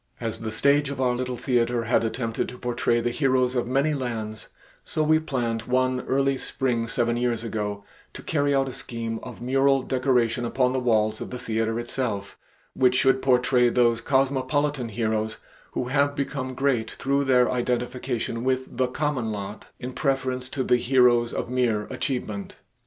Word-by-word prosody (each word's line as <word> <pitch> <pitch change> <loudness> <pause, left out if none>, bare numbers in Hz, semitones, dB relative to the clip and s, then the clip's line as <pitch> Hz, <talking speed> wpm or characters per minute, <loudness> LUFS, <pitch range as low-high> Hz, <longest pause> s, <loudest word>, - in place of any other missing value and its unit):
As 115 -2 -3
the 110 - -4
stage 140 +5 +2
of 140 - -5
our 125 -2 +2
little 125 0 -3
theater 120 -2 +1
had 115 +1 +2
attempted 115 0 -2
to 125 - -10
portray 120 -1 0
the 120 +1 0
heroes 130 -2 +2
of 120 -2 -1
many 135 +4 +2
lands, 115 -5 -4 0.4
so 155 - -1
we 155 +1 +4
planned 120 -7 -2
one 130 0 +2
early 135 0 +2
spring 120 -4 -1
seven 120 0 0
years 120 -2 0
ago, 105 -3 -3 0.3
to - - -9
carry 145 -2 +1
out 135 0 +2
a - - -4
scheme 115 -3 -4
of 125 -1 -9
mural 135 +1 +3
decoration 125 -2 +1
upon 125 +1 +1
the 130 - +1
walls 110 -3 +1
of - - -5
the 125 - -5
theater 115 -1 -1
itself, 120 -5 -3 0.4
which 125 -1 +3
should 130 +1 +3
portray 125 -1 +3
those 120 -1 +2
cosmopolitan 135 0 +1
heroes 110 0 -1 0.4
who 125 - -2
have 140 +1 +2
become 135 -2 -3
great 125 -5 +1
through 140 0 0
identification 125 -1 0
with 130 0 -1
the 130 0 +2
common 130 -3 -1
lot, 100 0 -6
in 125 +1 -6
preference 130 -3 -1
to 135 - -2
the 125 - +3
heroes 120 -2 +3
of - - -3
mere 120 -4 +1
achievement. 125 -6 -3
125 Hz, 170 wpm, -25 LUFS, 115-135 Hz, 0.4 s, we